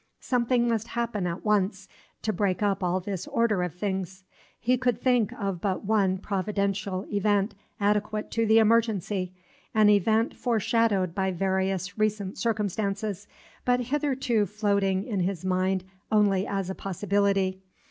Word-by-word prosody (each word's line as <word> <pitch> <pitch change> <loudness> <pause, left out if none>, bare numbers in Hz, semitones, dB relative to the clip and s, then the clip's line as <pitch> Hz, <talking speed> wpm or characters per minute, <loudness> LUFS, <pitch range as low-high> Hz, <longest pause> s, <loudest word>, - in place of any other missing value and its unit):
Something 240 -1 +1
must 225 -1 0
happen 230 -6 -2
at 170 +4 -5
once 200 -2 +1 0.4
to 215 - 0
break 185 0 0
up 200 -2 +1
all 180 +1 +1
this 190 -1 -5
order 225 -5 +1
of 180 -2 -3
things. 190 -1 -3 0.4
He 250 +3 +2
could 245 -2 0
think 245 -5 +2
of 195 -4 -3
but 195 0 -1
one 195 -3 +2
Providential 200 0 -2
event 205 0 +1 0.3
adequate 210 +1 0
to 230 -1 +1
the 220 +1 +5
emergency, 215 -4 +2 0.4
an 215 -1 +6
event 220 +3 +2
foreshadowed 225 -6 +1
by 190 +1 0
various 190 +1 -1
recent 210 -2 -1
circumstances, 205 -2 -2 0.4
but 245 0 +2
hitherto 255 -4 0
floating 200 -2 +1
in 210 -6 -2
his 185 -1 -2
mind 185 0 +1 0.3
only 205 -3 +3
as 195 -2 -2
a - - -3
possibility. 195 0 0
205 Hz, 140 wpm, -27 LUFS, 190-220 Hz, 0.4 s, an